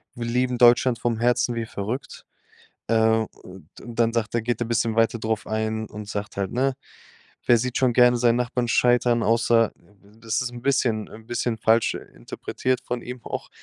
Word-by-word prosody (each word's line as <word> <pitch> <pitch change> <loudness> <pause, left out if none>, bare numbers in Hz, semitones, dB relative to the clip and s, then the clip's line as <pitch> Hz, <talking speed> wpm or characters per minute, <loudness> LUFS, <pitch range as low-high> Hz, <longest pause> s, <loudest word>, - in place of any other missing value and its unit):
„Wir 120 - -5
lieben 125 +1 0
Deutschland 120 0 +5
vom 115 -2 -1
Herzen 120 +1 +2
wie 115 -1 -2
verrückt.“ 110 +6 -6 0.6
Äh. 110 0 +3 0.2
Und 90 -4 -13 0.2
dann 115 -1 0
sagt 115 -1 -1
er 120 - +2
geht 120 +2 -2
er - - -2
'n - - -10
bisschen 115 -1 0
weiter 115 +1 +2
drauf 110 -1 -2
ein 110 0 -2
und 105 0 -9
sagt 105 -1 -5
halt, 100 -1 -1
ne: 130 +2 +1 0.7
„Wer 120 - +6
sieht 125 +2 -2
schon 130 -2 +3
gerne 125 0 +5
seinen 120 -1 +3
Nachbarn 125 0 -1
scheitern?“ 120 -1 +3
Außer, 115 0 +3 0.5
das 115 0 -1
ist 125 -1 -4
'n 120 - -8
bisschen 120 -5 0
'n 110 0 -13
bisschen 120 -1 -2
falsch 115 +1 +2
interpretiert 125 - -4
von 125 -1 -3
ihm 125 0 -8
auch, - - -5
115 Hz, 185 wpm, -24 LUFS, 110-125 Hz, 0.7 s, Wer